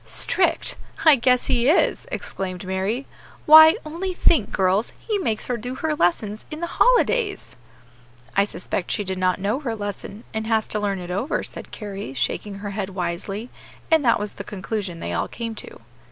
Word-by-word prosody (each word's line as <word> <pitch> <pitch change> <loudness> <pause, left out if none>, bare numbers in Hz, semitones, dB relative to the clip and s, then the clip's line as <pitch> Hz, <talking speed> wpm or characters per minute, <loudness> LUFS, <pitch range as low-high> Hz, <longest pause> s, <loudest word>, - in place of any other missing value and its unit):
"Strict! - - +1 0.3
I 310 -2 +9
guess 250 0 +2
he 245 +2 +2
is!" 345 - +2
exclaimed 185 - -4
Mary; 190 +8 -2 0.4
"why, 315 +1 +10
only 350 +4 -4
think, 310 - +3
girls, 190 +3 +1
he 425 -3 -2
makes 225 - -1
her 245 - -1
do 245 +3 -5
her 315 +3 -1
lessons 210 - 0
in 305 - -6
the 340 - -1 0.2
holidays!" 480 -4 +2 0.8
"I 200 - +4
suspect 185 -2 -4
she 210 - -1
did 190 -1 -4
not 185 0 +1
know 205 +7 0
her 240 -6 -3
lesson, 205 +1 -6
and 220 0 -3
has 220 -1 +1
to 210 - 0
learn 200 -1 -1
it 180 -1 -6
over," 205 - -1
said - - -8
Carry, 200 - -7
shaking 200 +9 -2
her 200 +1 -6
head 200 -1 -3
wisely; 195 +5 -4 0.4
and 320 -2 +5
that 235 -3 +4
was 205 0 -3
the 200 - -7
conclusion 195 -3 -4
they 85 - -3
all 85 - -1
came 230 -1 -5
to. 210 - -10
210 Hz, 180 wpm, -23 LUFS, 195-260 Hz, 0.8 s, why